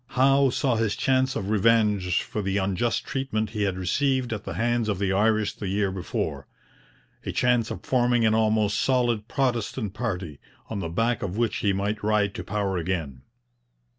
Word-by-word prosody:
Howe 135 +1 +5
saw 130 -2 0
his 110 -2 0
chance 130 +3 +1
of 100 -6 -3
revenge 105 -4 +2
for 105 - -4
the 95 0 -1
unjust 100 +4 0
treatment 110 -6 -2
he 105 -2 -3
had 95 -2 0
received 130 +6 0
at 105 - -6
the - - -5
hands 120 -1 0
of 100 - 0
the 95 0 0
Irish 110 +1 +2
the 100 - -6
year 100 0 0
before 95 -3 -4 0.8
a - - -3
chance 120 -3 +2
of - - -7
forming 120 -2 +2
an 110 - +3
almost 110 -1 +2
solid 120 -4 +1
Protestant 115 -7 -1
party, 95 - -4 0.3
on 105 - -2
the 85 - -3
back 115 +7 0
of 100 0 -4
which 115 -3 0
he 100 - +1
might 100 +2 -2
ride 105 -1 +1
to - - -6
power 100 -3 -2
again. 80 -7 -3
110 Hz, 180 wpm, -25 LUFS, 100-120 Hz, 0.8 s, Howe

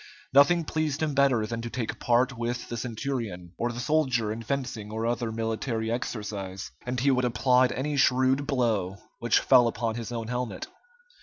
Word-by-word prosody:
Nothing 165 +5 +5
pleased 155 -1 -1
him 150 -2 0
better 135 -5 +3
than 115 +1 -4
to 120 - -5
take 115 -2 -4
part 125 +2 +2
with 120 0 -3
the 120 - -3
centurion, 115 -7 -4
or 120 +1 0
the 120 - -6
soldier 125 -6 +1
in 115 - -6
fencing 115 -4 -3
or 110 +1 -2
other 120 -1 -1
military 115 0 -2
exercise, 105 - -4 0.2
and 125 0 -1
he 135 +3 +3
would 130 -1 +2
applaud 125 +1 +3
any 145 +2 -2
shrewd 130 +2 +3
blow 110 -8 0 0.2
which 120 -1 +3
fell 125 -3 +5
upon 115 -1 -1
his 115 +1 -5
own 115 -2 -4
helmet. 125 0 -3
120 Hz, 175 wpm, -27 LUFS, 115-130 Hz, 0.2 s, Nothing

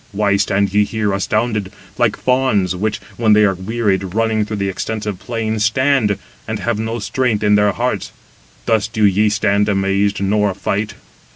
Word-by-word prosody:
Why 100 0 +2
stand 100 0 +1
ye 105 0 +4
here 105 -1 -1
astounded, 105 0 -1 0.2
like - - +1
fawns, 125 -8 +1
which, 105 +3 -1 0.2
when 110 -2 +4
they 105 0 +5
are 100 - +2
wearied, 95 -1 -2
running 110 -1 +1
through 105 - -4
the 100 -1 -1
extensive 105 0 -4
plain, 110 -1 -3
stand, 115 -1 +2 0.3
and - - -2
have 115 -2 -2
no 110 +1 -2
strength 115 -1 -1
in 105 0 +3
their 105 0 +4
hearts? 120 -5 -2 0.5
Thus 110 -2 +2
do 110 -1 -2
ye 105 +2 +3
stand 105 0 +1
amazed, 100 +1 +1
nor 100 0 +1
fight. 105 +2 -2
105 Hz, 170 wpm, -18 LUFS, 100-110 Hz, 0.5 s, they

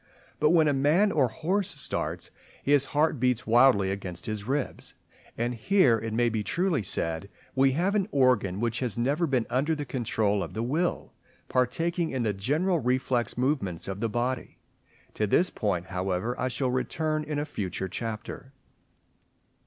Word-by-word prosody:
But 150 - +4
when 160 -2 +5
a 145 - +3
man 155 +10 +3
or 140 -7 +3
horse 180 - -2
starts, - - -3 0.3
his 140 -1 +4
heart 150 0 +1
beats 125 -1 +1
wildly 115 -5 +5
against 90 -3 -5
his 105 -2 -4
ribs, 135 +2 -3 0.4
and 120 +1 -1
here 125 - +3
it 110 +1 -4
may 120 +2 +2
be 110 -2 -1
truly 175 - 0
said 85 -1 -2 0.2
we 135 0 +3
have 180 +7 +1
an 200 -3 +1
organ 125 - +2
which 120 +1 -1
has 125 -4 -2
never 145 +8 +1
been 130 -5 +1
under 145 +5 +1
the 145 -1 -4
control 110 -5 0
of 90 - -6
the 110 - -1
will, 160 +8 -1 0.4
partaking 165 +7 0
in 130 -2 -2
the 105 -2 0
general 155 - 0
reflex 125 -2 0
movements 125 - -1
of 95 0 -4
the 115 +1 -1
body. 120 +3 -2 0.6
To 105 - 0
this 180 - +3
point, 90 -5 -1
however, 95 +4 -2
I 130 - 0
shall 130 0 -1
return 155 +5 -1
in 150 -1 -4
a 145 - -1
future 95 - -4
chapter. 115 +6 -6
125 Hz, 170 wpm, -27 LUFS, 110-150 Hz, 0.6 s, when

